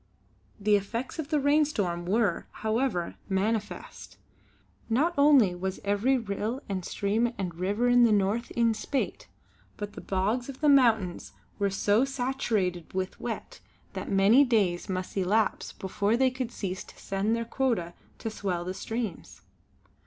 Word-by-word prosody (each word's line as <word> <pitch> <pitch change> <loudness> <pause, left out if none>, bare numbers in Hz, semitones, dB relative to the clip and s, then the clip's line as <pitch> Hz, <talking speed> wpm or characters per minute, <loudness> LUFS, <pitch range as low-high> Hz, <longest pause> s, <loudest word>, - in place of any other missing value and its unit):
The 210 +1 +3
effects 230 - -3
of 300 -2 -4
the 305 -2 +2
rainstorm 275 - +1
were, 205 -2 +1 0.2
however, 220 -6 0
manifest. 210 +2 -3 0.7
Not 295 +10 +2
only 280 -9 +5
was 185 +1 -4
every 205 +7 +2
rill 220 +2 -3
and 190 -2 -3
stream 215 +6 0
and 180 -3 -3
river 200 +8 0
in 245 0 +6
the 230 - +5
North 210 +4 +1
in 230 -1 +3
spate 270 +5 -3 0.5
but 205 0 -5
the - - -8
bogs 210 +7 -1
of 270 - -8
the 300 - +3
mountains 225 -10 +3 0.3
were 200 0 +2
so 205 +4 +2
saturated 240 - -1
with 185 0 -3
wet - - -5 0.3
that - - -5
many 200 +8 +6
days 200 -10 +1
must 185 0 -3
elapse 205 +3 +1
before 200 +4 -1
they 260 0 +3
could 255 -2 -4
cease 190 -4 -4
to - - -16
send 195 +3 -1
their 230 0 -2
quota 230 -9 -1 0.2
to 225 - -4
swell 180 -5 -3
the 185 - -3
streams. 220 -2 -5
215 Hz, 150 wpm, -28 LUFS, 190-245 Hz, 0.7 s, in